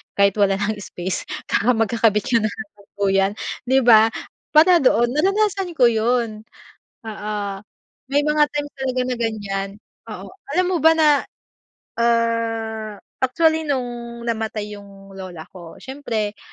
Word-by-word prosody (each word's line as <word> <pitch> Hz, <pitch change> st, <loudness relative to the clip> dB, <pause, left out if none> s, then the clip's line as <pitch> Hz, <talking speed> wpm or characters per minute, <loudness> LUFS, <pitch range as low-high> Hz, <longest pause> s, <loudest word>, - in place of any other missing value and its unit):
kahit 200 Hz, 0 st, +4 dB
wala 195 Hz, -1 st, +3 dB
ng 205 Hz, +1 st, -2 dB
space 185 Hz, -1 st, -5 dB, 0.5 s
magkakabit 225 Hz, -1 st, +2 dB
ka 235 Hz, -, +3 dB
na 215 Hz, -, 0 dB
ng 205 Hz, -1 st, -10 dB
duyan 195 Hz, -1 st, +2 dB, 0.4 s
di 265 Hz, +1 st, +4 dB
ba? 220 Hz, -2 st, +7 dB, 0.5 s
Para 345 Hz, +3 st, +7 dB
doon 240 Hz, -1 st, +4 dB
naranasan 390 Hz, +3 st, +1 dB
ko 245 Hz, -4 st, +5 dB
yun. 225 Hz, -1 st, 0 dB, 0.6 s
Oo 210 Hz, -1 st, -5 dB, 0.8 s
may 290 Hz, -, +4 dB
mga 300 Hz, 0 st, +3 dB
times 290 Hz, 0 st, -3 dB
talaga 260 Hz, -1 st, -2 dB
na 250 Hz, -, -1 dB
ganyan, 205 Hz, -4 st, -3 dB, 0.4 s
oo -, -, -8 dB, 0.2 s
alam 365 Hz, +2 st, +2 dB
mo 365 Hz, -, +1 dB
ba 320 Hz, +1 st, +5 dB
na? 305 Hz, -3 st, +3 dB, 0.7 s
Ah, 225 Hz, -2 st, 0 dB, 0.2 s
actually 320 Hz, +4 st, +2 dB
nung 240 Hz, -3 st, -4 dB
namatay 220 Hz, -3 st, -3 dB
yung 195 Hz, -1 st, -15 dB
lola 185 Hz, -4 st, -8 dB
ko, 170 Hz, -3 st, -11 dB
siyempre 225 Hz, -6 st, -4 dB
225 Hz, 130 wpm, -21 LUFS, 205-270 Hz, 0.8 s, ba